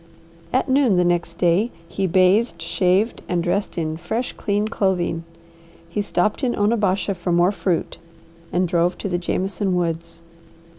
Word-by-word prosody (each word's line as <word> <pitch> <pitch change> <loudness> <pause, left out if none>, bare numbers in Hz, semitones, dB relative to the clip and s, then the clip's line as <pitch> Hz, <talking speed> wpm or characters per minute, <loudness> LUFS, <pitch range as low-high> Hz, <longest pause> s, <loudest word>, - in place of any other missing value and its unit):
At 260 - +1
noon 260 -7 +3
the 180 - +3
next 175 -1 0
day 180 +6 +2 0.2
he 195 +2 -1
bathed, 185 +6 +3
shaved, 185 +6 +1
and 175 -1 0
dressed 195 +3 -1
in 160 -1 -2
fresh, 220 +9 -3
clean 205 0 -1
clothing. 180 -5 -1 0.6
He 210 - -1
stopped 205 +5 0
in 245 -2 +1
Onabasha 205 -2 +1
for 175 -1 -3
more 175 +2 +4
fruit, 185 -4 -2 0.5
and 180 +1 +1
drove 175 +1 +1
to - - -4
the 175 -2 -1
Jameson 190 +2 -1
woods. 170 -1 -3
185 Hz, 150 wpm, -22 LUFS, 175-205 Hz, 0.6 s, more